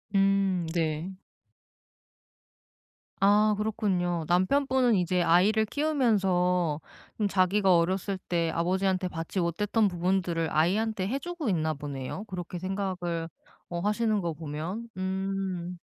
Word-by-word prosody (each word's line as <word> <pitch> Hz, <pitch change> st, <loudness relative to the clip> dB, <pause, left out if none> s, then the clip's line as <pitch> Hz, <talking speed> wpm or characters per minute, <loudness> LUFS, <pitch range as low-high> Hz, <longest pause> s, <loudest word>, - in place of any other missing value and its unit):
음 195 Hz, -3 st, +2 dB
네. 165 Hz, +1 st, -1 dB, 2.1 s
아 210 Hz, +2 st, +5 dB
그렇군요. 190 Hz, -6 st, -1 dB
남편분은 250 Hz, +7 st, +3 dB
이제 180 Hz, -1 st, +1 dB
아이를 185 Hz, +6 st, +4 dB
키우면서 190 Hz, -, +1 dB, 0.4 s
좀 210 Hz, -, +2 dB
자기가 190 Hz, -1 st, +3 dB
어렸을 190 Hz, +3 st, 0 dB
때 170 Hz, -2 st, -1 dB
아버지한테 185 Hz, +2 st, 0 dB
받지 165 Hz, +3 st, -4 dB
못했던 205 Hz, +5 st, +1 dB
부분들을 175 Hz, -2 st, 0 dB
아이한테 190 Hz, +5 st, +1 dB
해 265 Hz, +7 st, -1 dB
주고 345 Hz, -3 st, -5 dB
있나 160 Hz, -5 st, 0 dB
보네요. 140 Hz, +6 st, -5 dB
그렇게 180 Hz, -3 st, -6 dB
생각을 180 Hz, -3 st, -3 dB, 0.4 s
어 175 Hz, -, -3 dB
하시는 210 Hz, +2 st, +1 dB
거 170 Hz, -2 st, -2 dB
보면. 165 Hz, +9 st, -5 dB
음. 190 Hz, -1 st, -3 dB
185 Hz, 255 characters per minute, -28 LUFS, 170-205 Hz, 2.1 s, 아